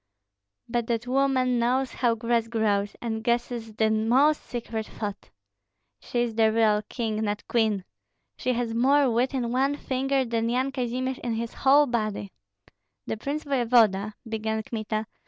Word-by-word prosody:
But 235 Hz, -1 st, -1 dB
that 235 Hz, 0 st, -1 dB
woman 255 Hz, -1 st, +2 dB
knows 255 Hz, +3 st, +1 dB
how 240 Hz, -2 st, +1 dB
grass 230 Hz, 0 st, 0 dB
grows, 210 Hz, -3 st, 0 dB
and 220 Hz, -1 st, -3 dB
guesses 235 Hz, -2 st, -1 dB
the 220 Hz, 0 st, +2 dB
most 250 Hz, +8 st, +3 dB
secret 225 Hz, -2 st, -5 dB
thought. 205 Hz, -2 st, -6 dB, 0.7 s
She 240 Hz, -, -2 dB
is 235 Hz, -2 st, -3 dB
the 220 Hz, 0 st, +3 dB
real 215 Hz, -2 st, +3 dB
king, 225 Hz, -3 st, -2 dB
not 210 Hz, -1 st, -2 dB
queen! 215 Hz, -5 st, +1 dB, 0.5 s
She 255 Hz, -, -1 dB
has 235 Hz, -1 st, -2 dB
more 270 Hz, +3 st, +4 dB
wit 250 Hz, +4 st, +1 dB
in 240 Hz, -3 st, -1 dB
one 270 Hz, +3 st, +1 dB
finger 270 Hz, 0 st, 0 dB
than 230 Hz, -1 st, -1 dB
Yan 255 Hz, +3 st, 0 dB
Kazimir 255 Hz, 0 st, -2 dB
in 235 Hz, -2 st, -1 dB
his 230 Hz, +1 st, -4 dB
whole 280 Hz, +2 st, +5 dB
body." 215 Hz, -5 st, -2 dB, 0.7 s
"The -, -, -2 dB
prince 280 Hz, +7 st, -4 dB
voevoda 225 Hz, -7 st, +2 dB
" -, -, -17 dB
began 220 Hz, 0 st, -2 dB
Kmita. 215 Hz, -1 st, -3 dB
235 Hz, 155 wpm, -26 LUFS, 220-255 Hz, 0.7 s, whole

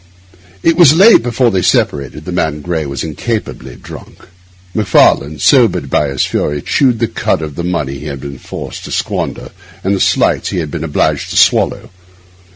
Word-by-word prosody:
It 165 Hz, 0 st, +2 dB
was 160 Hz, -4 st, +6 dB
late 200 Hz, -, +7 dB
before 120 Hz, 0 st, +1 dB
they 95 Hz, -2 st, 0 dB
separated; 75 Hz, -2 st, -1 dB
the 90 Hz, -, -5 dB
man 80 Hz, -4 st, -2 dB
Gray 80 Hz, -2 st, -3 dB
was 70 Hz, -1 st, -4 dB
incapably 80 Hz, -, -5 dB
drunk. -, -, -13 dB, 0.5 s
Macfarlane, 80 Hz, -7 st, +2 dB
sobered 110 Hz, -, +2 dB
by 75 Hz, -, +2 dB
his 70 Hz, -2 st, -1 dB
fury, 75 Hz, 0 st, -2 dB
chewed 130 Hz, -4 st, +2 dB
the 115 Hz, +1 st, 0 dB
cud 80 Hz, -, -2 dB
of 75 Hz, -2 st, -6 dB
the 85 Hz, -, -5 dB
money 75 Hz, -6 st, -3 dB
he 75 Hz, -, -8 dB
had 70 Hz, -2 st, -6 dB
been 70 Hz, -2 st, -8 dB
forced -, -, -8 dB
to -, -, -8 dB
squander -, -, -3 dB, 0.3 s
and 100 Hz, +1 st, +1 dB
the -, -, -3 dB
slights -, -, +1 dB
he -, -, -4 dB
had 80 Hz, -4 st, -3 dB
been 80 Hz, 0 st, -4 dB
obliged 80 Hz, -3 st, -1 dB
to -, -, -6 dB
swallow. -, -, +2 dB
80 Hz, 180 wpm, -14 LUFS, 70-115 Hz, 0.5 s, late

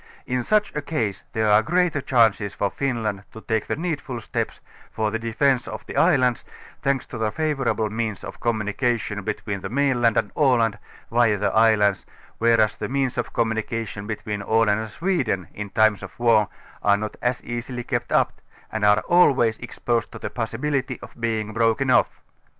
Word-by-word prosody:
In 125 Hz, 0 st, -1 dB
such 210 Hz, -, +1 dB
a 150 Hz, -, -1 dB
caise 115 Hz, -10 st, -2 dB
there 110 Hz, -1 st, +2 dB
are 105 Hz, +1 st, +6 dB
greater 170 Hz, +2 st, +1 dB
chances 110 Hz, -6 st, +2 dB
for 100 Hz, -, -1 dB
Finland 115 Hz, -7 st, -2 dB
to 110 Hz, -, -9 dB
take 110 Hz, -1 st, -1 dB
the -, -, -1 dB
needful 145 Hz, -7 st, -3 dB
steps -, -, -3 dB, 0.3 s
for'the 110 Hz, 0 st, -1 dB
defence 120 Hz, +3 st, +1 dB
of 110 Hz, -1 st, -7 dB
the -, -, -8 dB
islands, 130 Hz, -9 st, +3 dB, 0.4 s
thanks 135 Hz, -1 st, 0 dB
to -, -, -8 dB
the 110 Hz, -1 st, 0 dB
favourable 135 Hz, -7 st, 0 dB
means 110 Hz, -2 st, -3 dB
of 95 Hz, -, -8 dB
communi 110 Hz, -3 st, -1 dB
oation 115 Hz, -5 st, -1 dB
between 100 Hz, 0 st, -3 dB
the -, -, -5 dB
mainland 125 Hz, -4 st, +2 dB
and -, -, 0 dB
Aland, 120 Hz, -7 st, +2 dB, 0.3 s
via 115 Hz, -3 st, +3 dB
the 105 Hz, -, 0 dB
islands, 110 Hz, -3 st, +3 dB, 0.3 s
whereas 115 Hz, -2 st, +3 dB
the -, -, -4 dB
means 135 Hz, -1 st, 0 dB
of 120 Hz, -, -3 dB
communication 110 Hz, -2 st, -2 dB
between 105 Hz, -1 st, -4 dB
Aland 110 Hz, 0 st, +2 dB
and 110 Hz, 0 st, -5 dB
Sweden 125 Hz, -, -1 dB
in 105 Hz, -1 st, -6 dB
times 110 Hz, 0 st, +3 dB
of -, -, -10 dB
war 115 Hz, -3 st, +4 dB, 0.3 s
are 100 Hz, 0 st, +4 dB
not 110 Hz, 0 st, -5 dB
as 125 Hz, +1 st, -1 dB
easily 120 Hz, +1 st, -5 dB
kept -, -, -2 dB
uj), -, -, +4 dB, 0.4 s
and 110 Hz, -1 st, -3 dB
are 105 Hz, 0 st, +5 dB
always 135 Hz, -10 st, +4 dB
exposed 120 Hz, -1 st, -2 dB
to -, -, -7 dB
the -, -, -5 dB
possibility 130 Hz, +3 st, -2 dB
of -, -, -10 dB
being 110 Hz, -2 st, -1 dB
broken 115 Hz, +4 st, +2 dB
off. -, -, +2 dB
115 Hz, 175 wpm, -23 LUFS, 110-130 Hz, 0.4 s, are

